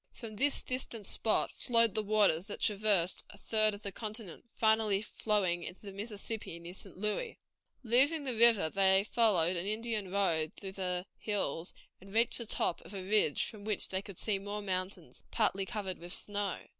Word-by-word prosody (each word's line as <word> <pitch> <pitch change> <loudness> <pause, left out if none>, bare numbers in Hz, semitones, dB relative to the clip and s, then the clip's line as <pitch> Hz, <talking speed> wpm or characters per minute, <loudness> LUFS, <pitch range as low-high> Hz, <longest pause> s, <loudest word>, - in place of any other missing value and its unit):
From 225 -3 -9
this 285 +5 +1
distant 245 -4 -4
spot 220 - +1
flowed 230 -3 +3
the 215 - 0
waters 200 -4 +3
that 205 - -6
traversed 205 -4 +2
a 200 - -13
third 215 0 +1
of 205 - -13
the 200 - -4
continent, 215 -2 -6
finally 220 -2 +3
flowing 200 -6 0
into 180 - -8
the 200 - -8
Mississippi 205 -2 -5
near 170 +1 -9
St. 195 -1 -11
Louis. 210 - -2 0.5
Leaving 270 +7 +3
the 260 -3 -2
river, 230 -5 +6
they 190 +2 +3
followed 200 -6 +2
an 175 +2 -2
Indian 215 -2 -2
road 170 -5 +1
through 195 -1 -6
the 180 -1 -2
hills, 180 -6 -2 0.2
and 195 +2 -14
reached 230 +2 +3
the 235 - -4
top 175 - -1
of 200 - -11
a 190 - -5
ridge 205 -8 +3
from 210 -2 -9
which 210 -1 -1
they 190 0 -2
could 195 -3 -10
see 205 -3 +1
more 205 +1 -5
mountains, 185 0 -3
partly 195 -4 0
covered 200 -5 -4
with 175 +2 -2
snow. 205 -2 0
205 Hz, 180 wpm, -32 LUFS, 190-220 Hz, 0.5 s, river